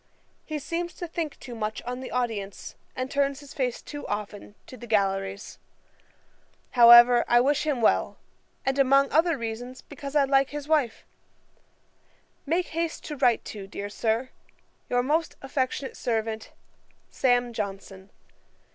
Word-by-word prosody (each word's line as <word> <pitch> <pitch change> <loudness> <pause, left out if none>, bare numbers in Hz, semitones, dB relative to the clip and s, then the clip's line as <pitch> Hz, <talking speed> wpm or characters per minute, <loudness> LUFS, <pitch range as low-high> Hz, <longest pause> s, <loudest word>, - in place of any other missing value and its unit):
He 310 - -4
seems 340 +4 -4
to 345 - -6
think 325 -3 -4
too 245 - -9
much 215 -1 -3
on 250 +1 -5
the 260 - -7
audience, 220 -6 -3 0.2
and 255 +1 -4
turns 280 0 0
his 285 -1 -12
face 255 -5 -2
too 290 -1 -7
often 205 0 -5
to - - -11
the 240 -1 -11
galleries. 195 -2 -1 1.1
'However, 240 0 +8
I 240 - +5
wish 285 +4 +1
him 275 -5 0
well; 220 - +2 0.5
and 270 +1 0
among 275 +1 +4
other 325 0 +3
reasons, 245 +2 -6
because 280 0 -9
I 290 - +5
like 275 0 +3
his 295 0 -6
wife. 290 -8 +1 1.4
'Make 340 +4 0
haste 330 0 -3
to 300 - -5
write 250 -4 +2
to, 200 -3 -8
dear 200 +1 -6
Sir, 225 +4 -1 0.6
'Your 245 0 +2
most 310 +5 0
affectionate 265 0 -2
servant, 220 -1 -2 0.6
'SAM. 245 -2 +2
JOHNSON.' 195 -2 -6
250 Hz, 145 wpm, -26 LUFS, 225-285 Hz, 1.4 s, However